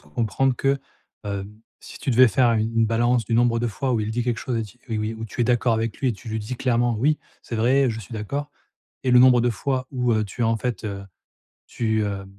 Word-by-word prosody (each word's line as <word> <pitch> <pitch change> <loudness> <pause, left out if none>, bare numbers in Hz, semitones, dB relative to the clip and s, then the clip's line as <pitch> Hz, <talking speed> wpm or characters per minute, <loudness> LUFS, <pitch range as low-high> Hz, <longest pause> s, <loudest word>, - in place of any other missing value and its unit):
comprendre 115 - 0
que, 140 0 +1 0.5
heu, 100 -1 -3 0.4
si - - -11
tu - - -2
devais 125 0 +6
faire 120 0 +3
u 110 - +2
une 115 0 +1
balance 120 +1 +2
du 115 - -1
nombre 120 0 +3
de 120 - 0
fois 130 +4 -2
où 115 - +1
il 105 0 -2
dit 120 +2 -1
quelque 120 -2 -1
chose 125 -3 -3
et - - -1
ti 110 +4 -12
oui 110 -1 -2
où 110 0 -6
tu 120 - -2
es - - +2
d'accord 120 -1 +2
avec 115 -1 -2
lui 130 - +1
et - - +1
tu 110 - -14
lui 110 - -2
dis 110 +4 -5
clairement: 120 -2 +1
«Oui, 150 +6 +2 0.2
c'est 115 - -7
vrai, 130 +3 +3
je 115 0 -5
suis 110 - -12
d'accord» 140 +7 -4 0.5
et 130 - +2
le 125 - +8
nombre 125 -1 +7
de 120 +1 +2
fois 130 +3 -2
où, 125 -2 +1
heu, 110 -1 +1
tu 120 +4 -5
as 115 - +3
en 115 - +2
fait, 120 0 -3
heu, 100 -2 -5 0.6
tu, 110 -2 -1
heu, 100 -1 -4
115 Hz, 255 wpm, -23 LUFS, 110-125 Hz, 0.6 s, le